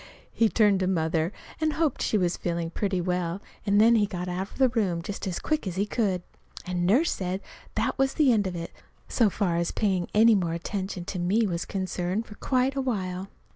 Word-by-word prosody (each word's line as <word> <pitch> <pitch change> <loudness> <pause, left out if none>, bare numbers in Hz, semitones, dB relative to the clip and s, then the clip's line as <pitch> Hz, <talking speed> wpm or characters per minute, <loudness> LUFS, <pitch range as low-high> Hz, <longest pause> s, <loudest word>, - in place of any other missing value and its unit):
He 225 -1 +3
turned 210 -4 +4
to 185 - 0
Mother 165 -1 +1 0.3
and 310 -1 +1
hoped 315 -4 0
she 215 - +2
was 180 -3 +1
feeling 170 -1 -3
pretty 195 0 -1
well, 180 0 -1 0.3
then 210 +3 +5
he 210 -3 +3
got 180 -2 -4
out 185 +3 -3
of - - -14
the 265 -2 +4
room 190 -8 0
just 200 +2 -5
as 180 - -2
quick 310 -9 -1
as 180 - -3
he 200 +2 +1
could. 200 -5 0 0.4
And 180 -1 -1
Nurse 270 - +4
said 185 0 -2 0.4
that - - -1
was 270 0 +2
the 290 -5 +4
end 205 -3 +2
of 180 - -4
it, 170 0 -5 0.4
so 230 -4 +3
far 180 -4 0
as 170 0 0
paying 190 -4 0
any 225 +2 +7
more 175 -5 +1
attention 185 +1 -4
to 185 -1 -4
me 200 +6 +2
was 170 -4 -2
concerned 190 +2 -2
for 210 - -11
quite 260 +4 0
a 270 - 0
while. 190 -7 -2
190 Hz, 210 wpm, -27 LUFS, 180-220 Hz, 0.4 s, any